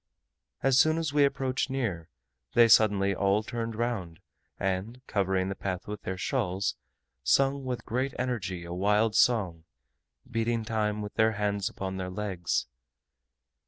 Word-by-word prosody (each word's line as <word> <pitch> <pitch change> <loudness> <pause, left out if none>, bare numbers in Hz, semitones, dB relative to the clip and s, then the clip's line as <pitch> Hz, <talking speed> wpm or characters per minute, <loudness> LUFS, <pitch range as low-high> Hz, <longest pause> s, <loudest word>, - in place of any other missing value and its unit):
As 135 0 +4
soon 155 0 +4
as 160 -3 -2
we 145 -1 +5
approached 135 -1 -1
near, 110 -12 -2 0.4
they 120 -1 +7
suddenly 100 -3 +5
all 100 +2 +2
turned 115 -1 -4
round, 105 -8 -3 0.4
and 95 +6 -2
covering 95 -2 0
the 95 - -2
path 95 -2 -4
with 105 0 -5
their 95 0 -4
shawls, 95 -3 -1 0.5
sung 135 - +3
with 125 -2 -4
great 130 +4 -1
energy 100 -9 -3
a 85 - -6
wild 105 +4 +2
song, 95 -9 +2 0.6
beating 115 0 -1
time 105 -1 -1
with 105 - -7
their 110 0 +3
hands 100 -2 -1
upon 95 0 -5
their 95 -1 -3
legs. 90 -4 -2
105 Hz, 145 wpm, -29 LUFS, 95-120 Hz, 0.6 s, they